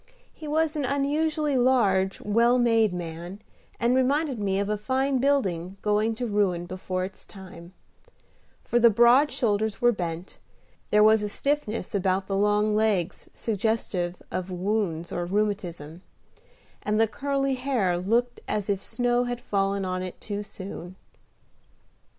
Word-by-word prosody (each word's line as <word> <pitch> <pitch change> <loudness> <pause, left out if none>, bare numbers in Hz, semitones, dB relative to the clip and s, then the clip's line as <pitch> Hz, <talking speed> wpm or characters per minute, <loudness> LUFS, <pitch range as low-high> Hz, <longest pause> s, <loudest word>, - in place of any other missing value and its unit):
He 310 - -9
was 315 +1 +1
an 295 - -1
unusually 295 +2 0
large, 205 -7 +2
well 235 +4 +3
made 225 -3 +3
man, 175 +2 -6 0.4
and 235 +1 +2
reminded 270 0 +1
me 195 -2 0
of 200 0 0
a 210 - 0
fine 260 +5 0
building 195 -10 0
going 215 +2 +1
to 245 - -3
ruin 200 -5 0
before 185 0 -3
its 190 - -11
time; 185 -3 -12 0.9
for 240 - +1
the 235 0 +7
broad 240 +6 +5
shoulders 215 -2 0
were 240 -1 +4
bent, 175 -3 -5 0.5
there 210 0 +5
was 220 0 +5
a 210 - -2
stiffness 275 -1 -2
about 190 -1 0
the 195 - -2
long 210 +1 +2
legs 205 -5 0
suggestive 205 -5 -2
of 185 0 -3
wounds 180 -3 -2
or 175 - -2
rheumatism, 180 -5 -2 0.8
and 210 +1 0
the 225 - +5
curly 275 +3 -1
hair 250 -9 0
looked 230 +7 0
as 210 -1 -1
if 195 -1 -2
snow 245 +2 0
had 245 0 -3
fallen 195 -2 -1
on 185 0 -2
it 185 -1 -7
too 205 -1 -4
soon. 185 -3 -9
210 Hz, 145 wpm, -26 LUFS, 190-245 Hz, 0.9 s, the